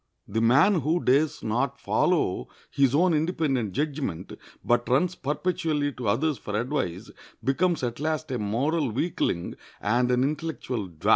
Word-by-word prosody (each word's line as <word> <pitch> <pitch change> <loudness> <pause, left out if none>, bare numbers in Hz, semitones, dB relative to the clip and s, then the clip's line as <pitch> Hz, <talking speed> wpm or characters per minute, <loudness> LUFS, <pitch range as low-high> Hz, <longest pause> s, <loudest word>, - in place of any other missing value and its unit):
The 110 +3 -1
man 140 - +5
who 160 +5 +1
dares 145 +4 +2
not 125 +5 -1
follow 170 - +1 0.2
his 140 -1 +3
own 175 +3 +4
independent 150 - 0
judgment, 140 - -3 0.3
but 120 +1 +2
runs 155 +8 +2
perpetually 150 -1 -1
to 125 -3 -6
others 140 +8 +1
for 105 0 -3
advice, 110 - -3 0.3
becomes 160 +4 +1
at 120 0 -2
last 155 -1 -2
a 125 - -1
moral 135 +8 0
weakling 110 - -2 0.2
and 120 +4 +1
an 125 0 +3
intellectual 140 - -3
dwarf. 80 -3 -3
135 Hz, 145 wpm, -26 LUFS, 120-155 Hz, 0.3 s, man